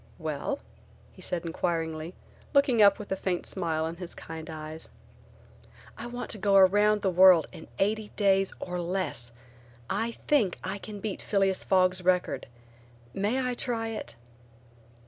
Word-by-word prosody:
"Well?" 155 - -3 0.6
he - - -15
said, 175 -1 -2
inquiringly 165 0 -2 0.4
looking 265 -5 +4
up 200 -1 +7
with 210 - -9
a - - +2
faint 185 -2 -2
smile 160 -4 -1
in 165 +1 -5
his 180 -1 -8
kind 160 0 -8
eyes. 155 0 -7 1.1
"I 235 - -7
want 245 +1 -5
to 215 - -3
go 200 0 +2
around 205 +2 +5
in 180 -3 +5
eighty 215 +2 0
days 195 -2 +3
or 180 -1 -4
less. 175 -9 -3 0.6
I 230 +1 -1
think 235 -12 +3
I 195 +2 -4
can 205 0 -8
beat 210 -2 -4
Phileas 195 -2 +1
Fogg's 185 -1 +3
record. 180 0 +1 0.7
May 235 - 0
I 250 - -1
try 230 -2 -2
it?" 220 - -6
190 Hz, 145 wpm, -28 LUFS, 170-210 Hz, 1.1 s, up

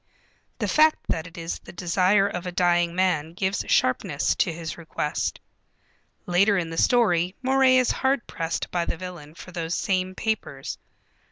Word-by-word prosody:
The - - -2
fact 310 0 +4
that 160 +1 -1
it 170 - -14
is 165 0 -4
the - - -12
desire 185 +3 +2
of 180 -2 -5
a - - -3
dying 175 -1 +2
man 165 -4 +1
gives 190 +1 -1
sharpness 140 +2 +1
to 175 - +2
his 165 0 -6
request. 160 -2 -3 0.9
Later 195 +3 +3
in 165 -3 -2
the 165 - -6
story 185 -7 +3
Moray 265 0 +4
is 255 -1 +3
hard 265 -1 0
pressed 165 0 -3
by 175 -1 0
the 170 - -3
villain 170 -4 -9
for 180 - -11
those 170 -1 -3
same 185 -1 -1
papers. 190 -12 -3
180 Hz, 165 wpm, -25 LUFS, 165-200 Hz, 0.9 s, fact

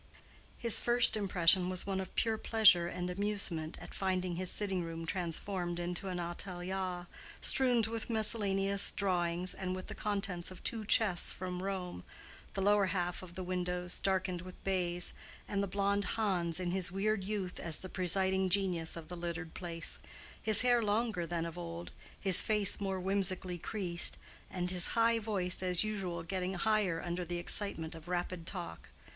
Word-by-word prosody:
His 235 -3 +2
first 240 -1 +4
impression 185 -3 +5
was 185 -1 0
one 195 -1 -2
of 190 - -9
pure 225 -2 0
pleasure 200 -6 +5
and 180 +1 -4
amusement 190 -5 -2
at - - -11
finding 185 -2 -2
his 185 +1 -1
sitting 195 -3 0
room 165 0 -6
transformed 175 0 -3
into 175 +2 -4
an 180 -1 -4
atelier 180 +1 -3 0.3
strewed 250 -5 +3
with 225 0 -4
miscellaneous 200 -3 +3
drawings 180 -2 -1
and 185 -1 -4
with 185 - -7
the - - -6
contents 200 -4 -2
of 185 - -12
two 225 -2 -1
chests 200 -4 +6
from 180 -1 -5
Rome, 185 - -5 0.5
the 195 - -1
lower 205 -1 +3
half 180 -2 -2
of 175 -2 -11
the 185 - -5
windows 180 0 -1
darkened 185 -2 -1
with 185 0 -10
baize, 180 -2 -1 0.3
and 200 -1 -1
the 200 - -1
blonde 200 +1 0
Hans 180 -6 0
in 180 -1 -2
his 180 -1 0
weird 200 +1 -1
youth 195 -2 -4
as 165 -3 -1
the 185 - -8
presiding 190 +1 0
genius 180 -4 +1
of 160 -2 -9
the 180 - -7
littered 170 -1 -5
place—his 175 +4 -2
hair 245 -1 +3
longer 210 -4 -1
than 170 -1 -3
of 170 +1 -7
old, 170 0 -7 0.3
his 190 -3 +8
face 210 -2 +2
more 195 -1 -2
whimsically 185 -1 -1
creased, 175 -3 0 0.3
and 180 -1 -2
his 180 -1 +3
high 230 0 +3
voice 195 -5 -2
as 180 0 +2
usual 190 -6 -4
getting 185 +1 -3
higher 200 -3 +1
under 175 +1 -3
the 175 0 -4
excitement 175 -2 +3
of 165 0 -12
rapid 175 -1 -4
talk. 175 - -6
185 Hz, 165 wpm, -33 LUFS, 175-200 Hz, 0.5 s, his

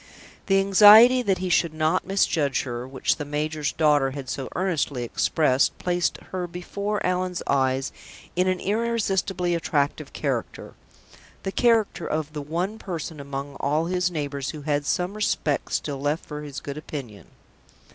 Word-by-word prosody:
The 195 -1 +4
anxiety 210 +6 +8
that 195 -6 +1
he 185 0 -3
should 170 -2 +2
not 155 +4 +1
misjudge 160 -8 +1
her, 120 0 -5
which 130 0 0
the - - -4
major's 150 0 -2
daughter 150 -4 +3
had 135 -1 -7
so 130 +1 -4
earnestly 160 -8 -1
expressed, 135 +2 +1
placed 175 -1 0
her 180 -1 -3
before 200 +4 -3
Allan's 180 0 -1
eyes 130 -1 +1 0.4
in 180 +1 +2
an 185 -1 +1
irresistibly 195 -4 0
attractive 150 -3 -1
character 135 -6 -3 0.7
the 195 - -2
character 230 -1 +2
of 155 -1 -2
the 150 - -4
one 175 +9 -3
person 165 -4 -5
among 140 0 -6
all 150 +3 +1
his 180 +1 0
neighbors 145 -4 -3
who 150 -2 -7
had 145 -1 -1
some 180 +2 0
respect 185 -8 -1
still 140 -2 -2
left 145 +3 -1
for 150 -1 -6
his 145 -2 -7
good 140 +1 -6
opinion. 130 -10 -8
155 Hz, 155 wpm, -25 LUFS, 140-185 Hz, 0.7 s, anxiety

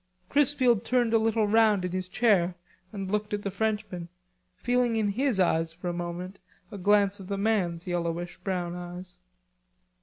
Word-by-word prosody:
Chrisfield 265 -6 +3
turned 245 -2 +1
a 225 - +5
little 220 0 +2
round 210 -3 +4
in 180 - -3
his 185 0 -3
chair 185 -5 +2 0.4
and 195 -2 -5
looked 210 0 -1
at 205 - -6
the 200 - -2
Frenchman, 200 -5 -2 0.5
feeling 245 - +1
in 215 -2 +1
his 245 0 0
eyes 165 -2 +2
for 180 +2 -5
a - - -2
moment 175 +2 -5 0.3
a 205 - -6
glance 200 +1 +3
of 190 - -9
the 200 0 -2
man's 195 -5 0
yellowish 175 -1 -3
brown 175 -3 -2
eyes. 180 +1 -8
195 Hz, 170 wpm, -28 LUFS, 180-220 Hz, 0.5 s, a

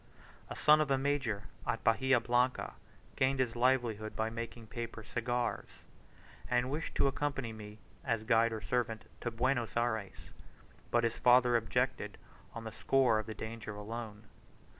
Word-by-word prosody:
A - - -5
son 150 0 +6
of 150 - 0
a 135 - +3
major 135 -7 0 0.2
at - - -1
Bahia 130 +3 +4
Blanca 125 +2 +1 0.4
gained 130 0 +2
his 125 -3 0
livelihood 120 -4 +1
by 110 0 -1
making 115 0 -6
paper 115 0 -6
cigars, 120 +2 -2 0.8
and 120 0 +2
he 130 - -4
wished 155 +3 -3
to - - +3
accompany 140 -4 -1
me, 105 -1 -10 0.3
as 115 -4 0
guide 115 0 +4
or 110 -1 -4
servant, 115 -2 -1 0.2
to 120 - -1
Buenos 120 -2 0
Ayres, 110 -4 -2 0.6
but 120 0 +2
his 115 0 0
father 125 0 +5
objected 120 -2 0 0.4
on 115 - -5
the 110 - -6
score 120 0 +3
of 110 - -5
the 110 - -5
danger 110 -1 -6
alone. 110 0 -6
120 Hz, 160 wpm, -33 LUFS, 110-130 Hz, 0.8 s, son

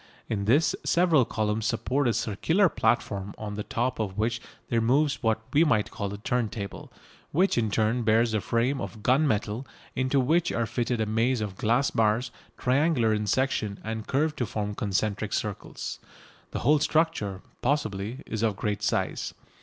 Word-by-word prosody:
In 100 -3 -2
this 140 +10 +3
several 170 -7 +4
columns 110 0 -1
support 130 +4 0
a 120 - +2
circular 140 - +2
platform 100 -7 0
on 105 -1 -5
the 105 - -3
top 120 +4 -2
of 100 -3 -3
which 115 +2 0 0.3
there 115 -1 +2
moves 135 +5 +2
what 110 -1 +1
we 150 - +6
might 115 -10 +2
call 100 -2 -4
a 100 - -5
turntable, 110 -2 -3 0.4
which 185 +5 +3
in 115 -3 +1
turn 110 +3 +1
bears 115 +1 +3
a 110 - +1
frame 120 +6 0
of 110 -2 -7
gun 135 +5 +4
metal 110 +2 -1 0.3
into 130 +2 +2
which 160 +7 +2
are 115 - 0
fitted 120 +2 -1
a - - +2
maze 115 +4 +1
of 105 -3 -4
glass 120 +7 +2
bars 115 +3 +1 0.3
triangular 130 -3 +2
in 105 0 -1
section 110 -3 0
and 110 0 -4
curved 150 +3 +1
to 120 - 0
form 105 0 -3
concentric 105 +1 -1
circles. 105 -2 -4 0.5
The - - -4
whole 150 +1 +4
structure, 150 - 0 0.2
possibly, 120 -3 -1
is 110 - -4
of 110 -3 +1
great 105 0 -2
size. - - -1
115 Hz, 170 wpm, -27 LUFS, 105-130 Hz, 0.5 s, we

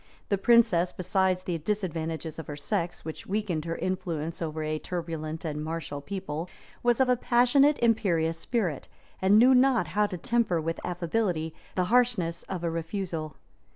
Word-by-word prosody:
That 200 - +1
princess, 210 -8 +4
besides 185 0 0
the 175 -3 -2
disadvantages 165 -4 -3
of 160 - -7
her 145 - -5
sex, 175 +3 -3
which 160 - -7
weakened 190 -6 -1
her 165 0 -2
influence 170 -4 -3
over 155 -1 -3
a 155 0 -2
turbulent 165 -2 -4
and 150 -1 -3
martial 155 -3 -4
people, 170 -1 -5 0.3
was 240 0 +2
of 265 - +4
a 250 - +4
passionate, 250 +4 +4
imperious 170 -8 +2
spirit, 180 - -2 0.3
and 195 +2 +5
knew 250 +4 +7
not 255 -1 +4
how 210 0 +2
to 185 - -5
temper 220 -2 +1
with 165 +1 -3
affability 175 -2 -1 0.2
the 185 - +2
harshness 220 -10 +2
of 180 -3 -4
a 170 - 0
refusal. 165 -2 -4
175 Hz, 160 wpm, -28 LUFS, 160-210 Hz, 0.3 s, knew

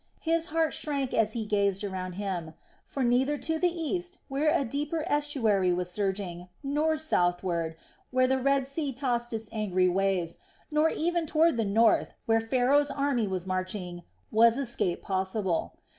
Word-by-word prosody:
His 330 0 +1
heart 325 0 +1
shrank 280 -4 -1
as 220 -1 +2
he 225 -2 -3
gazed 200 -1 +1
around 185 -2 -4
him; 180 -5 -4 0.3
for 270 - -3
neither 260 +4 +2
to 320 +2 -1
the 360 - +3
east, 350 +2 -3
where 280 +3 +1
a 315 -4 +2
deeper 295 +6 -2
estuary 260 - +1
was 180 0 -1
surging, 190 -3 -3
nor 300 +3 +1
southward, 175 - 0 0.3
where 255 0 +3
the 265 +1 +1
Red 275 0 +2
Sea 275 0 -3
tossed 240 -2 -1
its 225 -1 -3
angry 190 -5 +1
waves, 190 -2 0 0.3
nor 305 +1 +3
even 340 0 0
toward 320 0 +3
the 225 -2 0
north, 220 +3 +3
whence 225 -1 +2
Pharaoh's 270 +4 +3
army 275 -6 0
was 185 -2 -3
marching, 185 -1 -3 0.3
was 230 +2 +5
escape 240 -9 -1
possible. 190 -2 -1
235 Hz, 160 wpm, -28 LUFS, 190-290 Hz, 0.3 s, was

